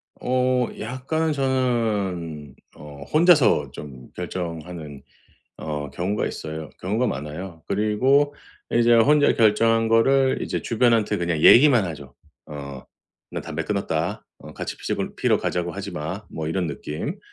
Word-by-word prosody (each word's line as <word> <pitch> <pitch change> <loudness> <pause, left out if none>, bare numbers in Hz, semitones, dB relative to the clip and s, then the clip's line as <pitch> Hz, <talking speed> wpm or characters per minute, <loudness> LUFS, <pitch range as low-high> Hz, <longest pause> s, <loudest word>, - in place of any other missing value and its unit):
어 125 -1 +1
약간 135 +8 -2
저는 105 - -1 0.2
어 70 -1 -11
혼자서 150 - +4
좀 65 -3 -10
결정하는 85 -4 -6 0.5
어 75 -2 -5
경우가 90 +8 -2
있어요. 80 -1 -6
경우가 110 +7 0
많아요. 80 - -6
그리고 130 +8 +2 0.4
이제 120 0 +4
혼자 145 +6 +5
결정한 115 +1 +3
거를 130 +4 +3
이제 - - -3
주변한테 115 -3 +2
그냥 85 -4 -1
얘기만 125 -4 +7
하죠. 75 -6 -8 0.3
어 70 -3 -8 0.5
"나 - - -4
담배 - - -5
끊었다. 95 -3 -2
어 - - -12
같이 - - -6
피자고 - - -3
피러 - - +2
가자고 85 -1 -2
하지 100 +2 -6
마." 90 +5 -5
뭐 80 -1 -5
이런 90 +2 -1
느낌. 75 - -5
100 Hz, 270 characters per minute, -23 LUFS, 80-125 Hz, 0.5 s, 얘기만